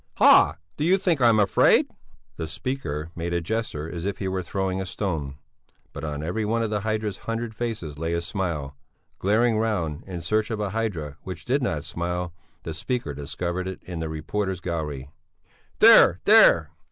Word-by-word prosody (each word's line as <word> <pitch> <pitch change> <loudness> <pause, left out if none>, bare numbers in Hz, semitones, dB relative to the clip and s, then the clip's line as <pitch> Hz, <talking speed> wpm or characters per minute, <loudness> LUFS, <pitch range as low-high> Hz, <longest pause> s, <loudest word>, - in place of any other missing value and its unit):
"Ha! - - +6 0.2
Do - - -1
you 180 +4 +4
think 175 -7 0
I'm 115 -3 +5
afraid?" 100 -2 +4 0.5
The 80 - -4
speaker 80 - -4
made 85 +1 -3
a - - +2
gesture 85 -4 -3
as 85 0 -6
if 100 +1 -2
he 95 - -3
were 95 0 -1
throwing 95 +1 -2
a - - -3
stone, 80 -9 -3 0.6
but 70 - -7
on 75 -1 -4
every 90 +7 -2
one 115 +2 0
of 110 - -2
the 105 - 0
hydra's 110 -1 -2
hundred 115 0 -3
faces 110 -11 -4
lay 80 +1 -1
a 85 - 0
smile. 85 -6 -3 0.4
Glaring 110 +3 +2
round, 90 -9 -1
in 90 -3 -5
search 105 +6 0
of 110 -2 -3
a 105 -2 -2
hydra 90 -11 -3
which 90 -2 -8
did 135 +3 +1
not 80 - -2
smile, 90 0 -3 0.3
the 80 - -5
speaker 100 - -3
discovered 85 +6 -4
it 95 - -7
in 90 -2 -6
the 80 -1 -3
reporters' 95 +5 -3
gallery. 75 -6 -4 0.7
"There! - - +7
There!" - - +6
90 Hz, 180 wpm, -25 LUFS, 80-110 Hz, 0.7 s, There